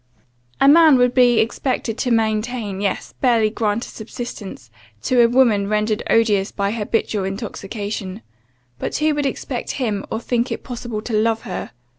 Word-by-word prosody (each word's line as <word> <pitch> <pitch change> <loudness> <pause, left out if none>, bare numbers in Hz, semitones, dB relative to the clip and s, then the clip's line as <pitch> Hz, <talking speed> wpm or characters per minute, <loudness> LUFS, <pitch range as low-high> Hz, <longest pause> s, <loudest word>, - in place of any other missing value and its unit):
"A 275 - +5
man 315 0 +7
would 250 0 +3
only 245 -1 +4
be - - +5
expected 230 0 -1
to 250 - 0
maintain; 220 -2 -1
yes, 200 -2 -2
barely 230 -4 +3
grant 220 0 -1
a - - -11
subsistence, 210 - -8 0.3
to 250 -1 +3
a 235 - +6
woman 230 -5 +3
rendered 215 0 0
odious 210 -3 +2
by 200 0 -1
habitual 215 -2 -1
intoxication; 200 0 -5 0.6
but - - -3
who 305 +1 +2
would 290 -1 0
expect 260 -1 -4
him, 215 -7 -2
or 220 - -2
think 240 +1 -1
it - - -4
possible 235 -4 -5
to 235 - -5
love 225 +1 +1
her? 205 -7 -5
225 Hz, 165 wpm, -20 LUFS, 210-245 Hz, 0.6 s, man